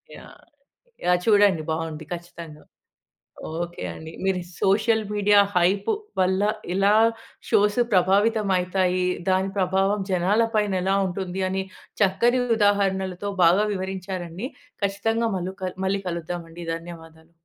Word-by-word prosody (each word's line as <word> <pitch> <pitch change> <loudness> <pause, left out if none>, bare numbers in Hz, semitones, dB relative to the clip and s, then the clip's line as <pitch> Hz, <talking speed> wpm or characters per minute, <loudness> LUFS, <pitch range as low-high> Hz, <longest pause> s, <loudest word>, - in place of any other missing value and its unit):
Yeah! - - -14 0.6
Yeah! 180 0 +3
చూడండి 205 -6 +4
బాగుంది 160 -1 -4
ఖచ్చితంగా. 170 -3 -8 1.0
ఓకే 175 0 -5
అండి. 160 0 -9
మీరు 190 -1 +1 0.2
సోషల్ 220 +3 +2
మీడియా 205 0 +4 0.2
హైప్ 190 +3 +2 0.3
వల్ల. 185 +1 +2 0.3
ఇలా 200 +2 +3 0.5
షోస్ 205 +2 +3
ప్రభావితం 200 +3 +3
అయితాయి. 180 0 0 0.3
దాని 190 +1 +1
ప్రభావం 195 +2 +1
జనాల 190 +5 +2
పైన 210 -2 +1
ఎలా 190 +1 +1
ఉంటుంది 185 0 -4
అని 190 +1 -1 0.4
చక్కని 235 +6 +3 0.2
ఉదాహరణలతో 200 -2 +1
బాగా 180 +5 +5
వివరించారండి. 185 +1 -5 0.4
ఖచ్చితంగా 225 +4 0
మల్లు 185 +1 -4
కల్ 185 0 -4
మళ్ళీ 195 +1 0
కలుద్దాం 170 0 -4
అండి. 170 +1 -9
ధన్యవాదాలు. 165 -1 -12
190 Hz, 115 wpm, -24 LUFS, 175-205 Hz, 1.0 s, బాగా